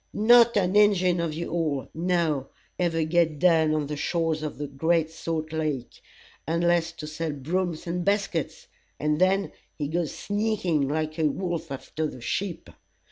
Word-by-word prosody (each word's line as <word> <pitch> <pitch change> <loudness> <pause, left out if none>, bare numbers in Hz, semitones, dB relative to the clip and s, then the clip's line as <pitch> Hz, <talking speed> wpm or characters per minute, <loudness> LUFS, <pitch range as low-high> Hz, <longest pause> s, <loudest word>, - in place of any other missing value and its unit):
Not 235 +1 +6
an 185 0 +1
Injin 185 -4 +4
of 165 -2 -2
you 170 +2 -4
all, 155 -5 -1
now, 165 -5 0 0.3
ever 165 -2 +1
get 160 -1 +2
down 160 -2 +4
on 150 -1 0
the 150 +1 -4
shores 165 +1 -1
of 155 -1 -5
the 145 - -3
great 160 +3 0
salt 160 -1 -4
lake, 150 -6 -3 0.5
unless 170 +1 +2
to 165 -2 -8
sell 155 0 -3
brooms 165 +4 -2
and 175 +1 -2
baskets, 200 -5 -1 0.3
and 150 +2 0
then 195 +2 +2 0.3
he 145 - -2
goes 165 +1 -1
sneaking 205 -8 0
like 155 +1 -2
a 155 - +3
wolf 170 0 -3
after 155 +3 -4
a 140 - -5
sheep. 170 +10 -3
165 Hz, 160 wpm, -26 LUFS, 155-180 Hz, 0.5 s, Not